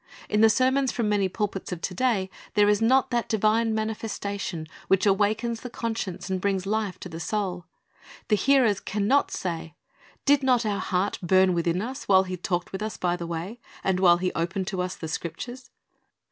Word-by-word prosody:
In 210 - +1
the 225 - +7
sermons 260 +3 +2
from 230 -4 -1
many 200 -2 +2
pulpits 200 -1 -3
of 180 - -4
to 185 - -3
day 195 -3 0 0.2
there 205 0 +5
is 210 +1 +3
not 255 +4 +3
that 240 -1 0
divine 220 +1 +2
manifestation 205 -6 -3 0.2
which 195 +1 +3
awakens 215 +4 +1
the 250 - -6
conscience 225 -6 -4
and 190 -1 -2
brings 195 -1 0
life 205 -2 -1
to - - -6
the 165 -2 -8
soul. 180 -1 -2 0.6
The 215 - +5
hearers 235 -2 +3
can 200 0 -2
not 280 +4 +3
say, 165 -3 -4 0.5
"Did 285 0 +5
not 250 -3 +2
our 205 -2 0
heart 190 +2 -1
burn 185 +1 +4
within 170 +2 0
us, 260 +4 -6
while 190 -1 +6
He 185 -1 -4
talked 175 0 -2
with 190 - -5
us 215 0 -4
by 175 -1 0
the 170 -1 -6
way, 170 +8 -5 0.2
and 190 -1 +1
while 175 -2 +6
He 185 +1 -1
opened 175 +3 -2
to 190 -2 -2
us 180 0 -3
the 160 - -6
Scriptures?"' 240 +11 -6
200 Hz, 195 wpm, -26 LUFS, 180-225 Hz, 0.6 s, the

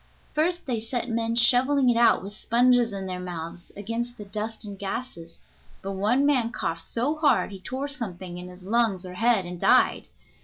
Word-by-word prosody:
First 345 +3 0
they 245 -4 -1
set 240 +2 -2
men 230 0 -1
shoveling 255 +3 +4
it 240 - +4
out, 235 -5 +4
with 200 +1 -7
sponges 240 +1 +3
in 195 -1 -5
their 185 -1 -4
mouths, 175 -1 -7
against 230 +4 -4
the 210 - -8
dust 215 +2 -5
and 200 -2 -8
gases, 195 -5 -6 0.4
but 195 - -3
one 215 +8 +1
man 255 -5 +2
coughed 165 -8 -3
so 270 +7 -1
hard 300 -8 +2
he 195 - -8
tore 260 +8 -4
something 185 -10 -5
in 180 - -8
his 180 0 -13
lungs 205 -2 +1
or 180 - -8
head 225 0 +2
and 175 0 -7
died. - - +3
225 Hz, 190 wpm, -26 LUFS, 190-245 Hz, 0.4 s, shoveling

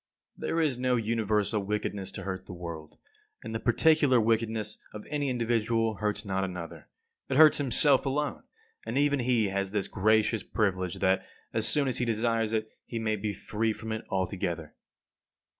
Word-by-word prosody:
55. - - -16
There 165 - +1
is 145 -6 +1
no 125 0 +2
universal 110 -2 0
wickedness 100 -1 -2
to 95 - -6
hurt 95 0 -5
the 95 - -7
world; 85 -3 -8 0.5
and - - -6
the 110 - -1
particular 140 +2 +4
wickedness 110 -1 0 0.2
of 105 - -8
any 145 -2 0
individual 115 -2 0
hurts 105 -1 -2
not 95 -1 -1
another. 85 -4 -6 0.4
It 135 - +1
hurts 155 -1 +7
himself 140 +1 +3
alone, 145 +2 -1 0.4
and - - -3
even 145 0 +3
he 120 -4 +2
has 100 0 -1
this 100 -1 -1
gracious 110 +2 +2
privilege 95 -4 -1
that, 95 0 +2 0.3
as 110 -1 +1
soon 145 -2 +2
as 130 - 0
he 125 - +1
desires 115 -1 0
it, 110 -1 -1
he 115 - -6
may 110 -1 0
be 105 0 -2
free 110 +3 -2
from 110 +1 -7
it 110 0 -3
altogether. 90 -4 -2
110 Hz, 175 wpm, -29 LUFS, 100-120 Hz, 0.5 s, hurts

